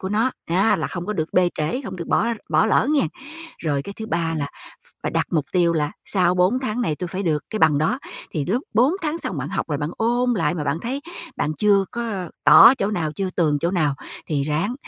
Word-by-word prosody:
của 190 Hz, -, -3 dB
nó 220 Hz, +5 st, +1 dB, 0.2 s
á 190 Hz, +6 st, +3 dB
là -, -, -2 dB
không 175 Hz, 0 st, -6 dB
có 210 Hz, -, -1 dB
được 160 Hz, -5 st, -3 dB
bê 180 Hz, -1 st, +4 dB
trễ, 155 Hz, -, -2 dB
không 190 Hz, -2 st, -6 dB
được 170 Hz, -, -6 dB
bỏ -, -, +2 dB, 0.2 s
bỏ -, -, +3 dB
lỡ 220 Hz, -, +3 dB
nghe. 285 Hz, -, +2 dB, 0.5 s
Rồi 145 Hz, -4 st, -1 dB
cái 200 Hz, -, -7 dB
thứ 220 Hz, -, -6 dB
ba 165 Hz, -5 st, -1 dB
là 140 Hz, -2 st, -2 dB
ph -, -, -17 dB, 0.2 s
phải -, -, -1 dB
đặt -, -, +1 dB
mục 155 Hz, -4 st, +1 dB
tiêu 175 Hz, -2 st, +3 dB
là 150 Hz, -2 st, -1 dB
sau 180 Hz, -2 st, +2 dB
4 185 Hz, +8 st, +3 dB
tháng 245 Hz, -2 st, -2 dB
này 155 Hz, -9 st, -1 dB
tôi 180 Hz, -, -4 dB
phải 190 Hz, +3 st, -4 dB
được 155 Hz, -4 st, 0 dB
cái 215 Hz, -, -3 dB
bằng 155 Hz, -3 st, +4 dB
đó. 195 Hz, -, +1 dB, 0.3 s
Thì 150 Hz, -4 st, -2 dB
lúc 230 Hz, -, 0 dB
4 250 Hz, +7 st, +4 dB
tháng 315 Hz, +1 st, -1 dB
xong 185 Hz, -, -4 dB
bạn 140 Hz, +2 st, -3 dB
học -, -, -3 dB
rồi 145 Hz, -3 st, -1 dB
bạn 145 Hz, +2 st, -2 dB
ôn 240 Hz, +2 st, +1 dB
lại 165 Hz, -5 st, 0 dB
mà 155 Hz, -4 st, -3 dB
bạn 145 Hz, +3 st, -1 dB
thấy 260 Hz, +7 st, -3 dB, 0.4 s
bạn 150 Hz, -, -1 dB
chưa 200 Hz, -2 st, +4 dB
có 215 Hz, -7 st, -4 dB
tỏ 260 Hz, -, +9 dB
chỗ 200 Hz, -4 st, -1 dB
nào, 160 Hz, -7 st, -2 dB
chưa 190 Hz, +3 st, -3 dB
tường 150 Hz, -4 st, +2 dB
chỗ 170 Hz, -, +1 dB
nào 155 Hz, -7 st, +1 dB, 0.3 s
thì 145 Hz, -3 st, -1 dB
ráng 160 Hz, -, -1 dB
180 Hz, 250 wpm, -22 LUFS, 155-220 Hz, 0.5 s, tỏ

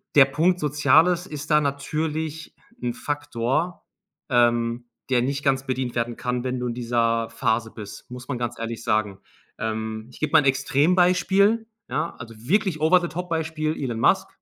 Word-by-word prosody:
der 140 Hz, -2 st, +9 dB
Punkt 170 Hz, +7 st, +1 dB
Soziales 150 Hz, +5 st, +3 dB
ist 150 Hz, 0 st, -7 dB
da 150 Hz, 0 st, +5 dB
natürlich 155 Hz, +3 st, -3 dB, 0.3 s
'n 120 Hz, -1 st, -1 dB
Faktor, 145 Hz, +4 st, -2 dB, 0.5 s
ähm, 120 Hz, -1 st, +2 dB, 0.2 s
der 125 Hz, -2 st, +3 dB
nicht 140 Hz, +2 st, -2 dB
ganz 135 Hz, -1 st, +1 dB
bedient 130 Hz, -2 st, -2 dB
werden 120 Hz, 0 st, -2 dB
kann, 125 Hz, 0 st, -2 dB
wenn 130 Hz, -1 st, -2 dB
du 125 Hz, -, -2 dB
in 120 Hz, -, -2 dB
dieser 115 Hz, -1 st, 0 dB
Phase 115 Hz, 0 st, -1 dB
bist, 105 Hz, +1 st, -10 dB
muss 125 Hz, +1 st, -8 dB
man 130 Hz, -, -3 dB
ganz 120 Hz, -1 st, -4 dB
ehrlich 115 Hz, 0 st, -5 dB
sagen. 105 Hz, -3 st, 0 dB, 0.4 s
Ähm, 110 Hz, 0 st, -3 dB
ich -, -, -15 dB
geb 155 Hz, 0 st, -2 dB
mal 160 Hz, -, +8 dB
'n -, -, -4 dB
Extrembeispiel, 180 Hz, +10 st, +3 dB, 0.2 s
ja, 155 Hz, +6 st, -2 dB
also 115 Hz, -1 st, -9 dB
wirklich 165 Hz, -, 0 dB
over 175 Hz, +4 st, +5 dB
the 175 Hz, -, -3 dB
top 180 Hz, +3 st, -5 dB
Beispiel 160 Hz, -1 st, -1 dB
Elon 120 Hz, -4 st, -2 dB
Musk. 190 Hz, +10 st, +3 dB
135 Hz, 170 wpm, -24 LUFS, 120-160 Hz, 0.5 s, der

